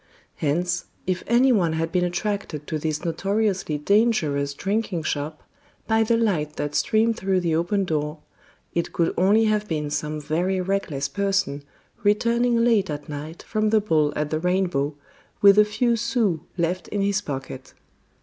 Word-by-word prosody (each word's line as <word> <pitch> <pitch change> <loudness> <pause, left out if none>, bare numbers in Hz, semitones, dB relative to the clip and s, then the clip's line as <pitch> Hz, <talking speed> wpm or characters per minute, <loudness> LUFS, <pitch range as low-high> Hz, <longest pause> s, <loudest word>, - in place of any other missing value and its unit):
Hence, 175 +4 0 0.2
if 185 -1 -1
any 245 +3 +4
one 175 -8 +2
had 165 +1 -2
been 180 0 +1
attracted 180 -4 -3
to 155 0 -3
this 155 +2 -3
notoriously 195 -2 0
dangerous 150 -7 +1
drinking 195 -3 -2
shop 155 +1 -3 0.4
by 225 0 +2
the 230 +1 +2
light 165 -10 0
that 145 0 -3
streamed 220 +9 +2
through 190 -1 0
the 170 -2 0
open 190 +4 0
door, 150 -2 -2 0.6
it 170 - -2
could 165 -1 +1
only 205 +5 +4
have 215 -1 +1
been 150 -4 -2
some 150 +1 -2
very 170 +6 -1
reckless 180 -7 -1
person 195 -3 -1 0.4
returning 235 +3 +2
late 215 -5 +3
at 145 0 -5
night 150 +3 -7
from 215 0 0
the 220 0 +4
ball 155 -8 +2
at 150 0 -2
the 155 - 0
Rainbow, 175 -5 0 0.4
with 200 0 +7
a 210 - +7
few 235 +3 +1
sous 225 -6 0 0.2
left 175 +1 -1
in 205 - -2
his 200 0 +1
pocket. 135 -5 -7
180 Hz, 160 wpm, -24 LUFS, 155-210 Hz, 0.6 s, with